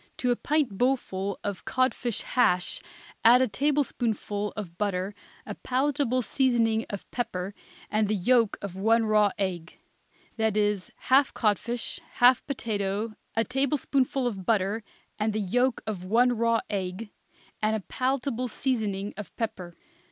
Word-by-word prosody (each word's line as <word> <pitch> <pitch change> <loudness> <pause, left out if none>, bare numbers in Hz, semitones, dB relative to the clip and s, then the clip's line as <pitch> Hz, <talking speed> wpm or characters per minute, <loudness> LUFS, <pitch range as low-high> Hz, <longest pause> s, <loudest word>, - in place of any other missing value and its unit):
To 250 - +1
a - - +3
pint 280 -8 0
bowlful 200 -7 0
of 200 -3 -4
codfish 255 -3 0
hash 180 -8 +1 0.4
add 240 +2 +8
a 260 - +3
tablespoonful 230 -6 -1
of 185 -5 -6
butter, 195 0 -1 0.3
a - - -5
palatable 260 -1 0
seasoning 230 -2 +2
of 200 - -6
pepper 195 -5 -3 0.3
and 215 0 +1
the 215 - +1
yolk 230 +2 +3
of 195 -3 -5
one 225 +4 +3
raw 210 -1 +4
egg. 180 -4 -3 0.6
That 220 -2 +1
is, 205 -3 +1 0.2
half 270 +1 +5
codfish, 230 +2 -1
half 245 +1 +5
potato, 215 -4 -2 0.2
a 225 - +3
tablespoonful 270 0 0
of 200 -6 -2
butter 210 +1 +1 0.4
and 215 0 +1
the 215 - -1
yolk 245 +5 +1
of 205 -5 -4
one 240 +6 +3
raw 230 0 +2
egg, 195 +1 -4 0.5
and 215 0 +2
a 215 - -2
palatable 255 +2 -1
seasoning 215 -5 -2
of 210 - -8
pepper. 180 -6 -4
220 Hz, 140 wpm, -27 LUFS, 200-250 Hz, 0.6 s, add